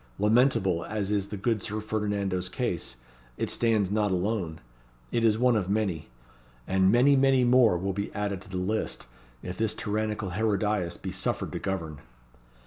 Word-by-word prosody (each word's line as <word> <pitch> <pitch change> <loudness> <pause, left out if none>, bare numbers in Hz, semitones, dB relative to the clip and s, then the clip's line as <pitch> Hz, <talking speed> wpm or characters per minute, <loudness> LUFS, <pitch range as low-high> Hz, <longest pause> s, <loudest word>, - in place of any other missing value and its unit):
Lamentable 105 -5 +3
as 105 -2 -3
is 100 -2 0
the 105 - -6
good 110 +1 0
Sir 105 +3 -3
Ferdinando's 100 -4 -2
case, 90 - -3 0.4
it - - -1
stands 110 -5 +1
not 105 0 +1
alone. 90 -3 -1 0.5
It 115 - 0
is 110 -2 +4
one 125 0 +3
of 100 -4 -1
many. 95 -9 -1 0.6
And 95 0 +3
many, 130 +5 +5
many 135 -1 +4
more 120 -6 +5
will 95 +2 -2
be 100 +2 -3
added 100 -2 -2
to - - -12
the 95 - -4
list, 100 +4 -2 0.4
if 90 +2 -6
this 110 -1 +1
tyrannical 105 -2 -2
Herodias 105 -3 0
be 95 - -6
suffered 95 - -2
to - - -4
govern." 85 -7 -4
105 Hz, 165 wpm, -27 LUFS, 95-110 Hz, 0.6 s, many